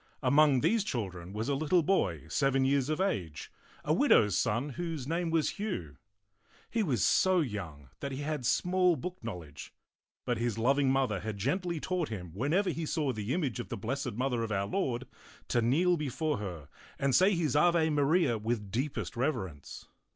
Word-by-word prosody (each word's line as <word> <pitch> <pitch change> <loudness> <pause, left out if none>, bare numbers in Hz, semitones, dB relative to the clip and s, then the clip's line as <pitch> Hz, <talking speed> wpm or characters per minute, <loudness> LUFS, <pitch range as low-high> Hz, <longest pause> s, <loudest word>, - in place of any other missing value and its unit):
Among 140 0 +5
these 225 - +2
children 95 - -4
was 110 +3 -3
a 140 - +1
little 155 +5 +2
boy 95 - +1
seven 135 -1 +1
years 140 0 +2
of 155 +2 -1
age, 95 - -2 0.3
a - - +2
widow's 105 -4 +4
son, 115 +5 0
whose 160 -2 -4
name 170 +2 -1
was 160 -2 +1
Hugh. 85 - -4 0.7
He 230 - +1
was 130 - +1
so 185 -1 +4
young 85 - -5
that 140 - -4
he 135 +2 -4
had 150 -2 -3
small 180 +8 +2
book 180 +3 -6
knowledge, 90 -10 -8 0.5
but 120 -2 -1
his 115 -2 -1
loving 135 +4 +2
mother 130 -7 +1
had 110 -2 -5
gently 170 - -1
taught 180 0 -2
him 90 -6 -6
whenever 160 - +1
he 160 -1 -4
saw 150 -5 0
the 110 +1 -4
image 140 -7 -1
of 120 - -6
the - - -4
Blessed 135 +3 -3
Mother 125 +1 -1
of 115 -1 -3
Our 100 -1 0
Lord 130 - -2 0.4
to 120 - +2
kneel 170 +10 +3
before 150 0 -2
her 90 -8 -6 0.3
and 135 -1 +1
say 190 +5 +5
his 155 -6 0
Ave 160 0 +4
Maria 145 -4 +2
with 105 -2 -3
deepest 130 +4 -3
reverence. 95 - -3
135 Hz, 180 wpm, -31 LUFS, 110-160 Hz, 0.7 s, Among